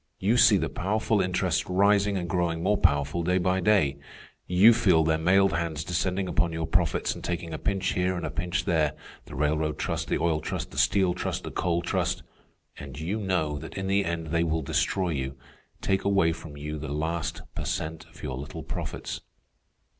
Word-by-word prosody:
You 105 +5 +2
see 120 -4 +6
the - - 0
powerful 105 +2 0
interests 90 -1 0
rising 100 +1 +3
and 90 -2 -3
growing 85 -1 -1
more 105 +3 +3
powerful 75 -2 +2
day 90 +2 +1
by 95 +1 +1
day; 90 -10 +2 0.5
you 95 +6 +7
feel 90 -8 +4
their 80 0 +1
mailed 95 +3 +4
hands 80 -2 -2
descending 90 +3 -1
upon 85 -1 +1
your 80 0 -2
profits 90 -1 +1
and - - -10
taking 85 -1 -3
a 80 - -4
pinch 100 -1 0
here 90 0 0
and - - -3
a - - -3
pinch 90 +5 -2
there—the 80 -4 -2
railroad 75 +2 0
trust, - - -2
the - - +1
oil 80 -2 +1
trust, - - -4
the - - -3
steel 95 -3 +3
trust, 90 - -3
the - - -6
coal 85 -1 0
trust; 85 - -1 0.6
and 70 0 -8
you 90 +8 -2
know 90 -7 -1
that - - -9
in 95 - -3
the 100 +1 +2
end 85 -3 -3
they 85 0 +2
will 80 -1 0
destroy 95 +6 0
you, 65 -3 -3 0.4
take 95 0 0
away 100 -5 +3
from 80 -3 -10
you 75 +1 -5
the 75 -1 -5
last 80 +2 -2
per - - -4
cent 80 0 -3
of 80 -2 -16
your 65 -3 -4
little 70 - -7
profits. - - -5
85 Hz, 195 wpm, -27 LUFS, 80-95 Hz, 0.6 s, you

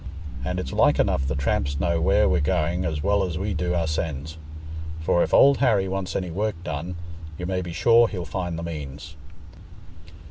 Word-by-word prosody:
And - - -2
it's - - -5
like - - +4
enough 65 0 +1
the 70 - -1
tramps 70 +1 0
know 85 -2 +1
where 80 - +4
we're 75 -1 +2
going 85 +4 0
as 75 -3 -2
well 100 +2 +2
as 90 -4 -3
we 100 +2 -2
do 90 +2 -1
oursens; 80 -2 -2 0.6
for 80 +2 +2
if - - 0
Old 140 0 +6
Harry 105 -8 +3
wants 95 -1 -3
any 90 -3 -2
work 105 +3 -1
done, 85 +3 -4 0.4
you 90 - -5
may 90 0 -1
be 90 -1 -6
sure 115 +6 +5
he'll 90 -5 -5
find 90 -3 -3
the 85 - -5
means." 75 -2 -7
85 Hz, 185 wpm, -24 LUFS, 75-95 Hz, 0.6 s, Old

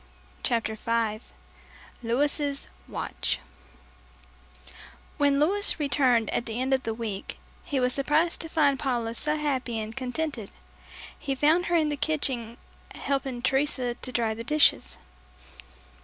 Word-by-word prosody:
CHAPTER 225 -3 0
FIVE 225 0 -1 0.7
LOUIS' 280 +4 0 0.2
WATCH - - -2 1.8
When 285 -1 +3
Louis 390 +5 +5
returned 260 -6 +2
at 240 - -1
the 225 +1 -3
end 260 +1 +1
of 265 - +2
the 225 - -3
week, 215 -4 -5 0.3
he 280 - -1
was 250 0 +2
surprised 295 +5 +1
to 325 - -5
find 285 -4 +2
Paula 240 -5 -1
so 300 +6 0
happy 265 -6 -1
and 220 +1 -5
contented. 260 -3 -3 0.7
He 275 -2 -2
found 315 +6 +3
her 345 - +1
in 315 -2 +3
the 295 - -2
kitchen 260 -7 0 0.4
helping 270 -3 -2
Teresa 265 -3 +1
to 255 +1 -6
dry 230 -2 0
the 230 +1 -6
dishes. 230 - +3
265 Hz, 130 wpm, -27 LUFS, 230-295 Hz, 1.8 s, Louis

